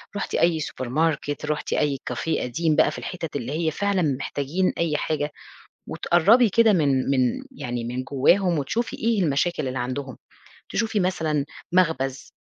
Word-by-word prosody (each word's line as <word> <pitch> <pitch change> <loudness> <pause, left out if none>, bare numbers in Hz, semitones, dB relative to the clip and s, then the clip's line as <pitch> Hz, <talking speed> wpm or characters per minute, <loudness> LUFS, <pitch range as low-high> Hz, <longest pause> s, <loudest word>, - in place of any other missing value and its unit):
رُحتِ 205 - -3
أي 170 -2 +3
supermarket، 145 +2 -1
رحتِ 150 0 -2
أي 145 -2 +1
café 140 +6 -1
قديم 155 +6 0
بقى - - +4
في - - -7
الحِتت 165 -5 -6
اللي 130 -2 -3
هي 160 +1 0
فعلًا 200 +3 0
محتاجين 145 +4 -1
أي 165 -3 0
حاجة، 150 -1 -2 0.6
وتقربي 210 +7 +4
كده 225 +1 +4
من 140 -7 +2
من 135 - +1
يعني 120 - -4
من 125 +2 -3
جواهم 165 +6 +2
وتشوفي 225 - -2
إيه 225 -3 +1
المشاكل 155 0 0
اللي 130 0 -3
عندهم. 130 +1 -4 0.5
تشوفي 220 -2 0
مثلًا 160 -6 0 0.3
مخبز، 145 -7 +1
155 Hz, 150 wpm, -24 LUFS, 135-180 Hz, 0.6 s, بقى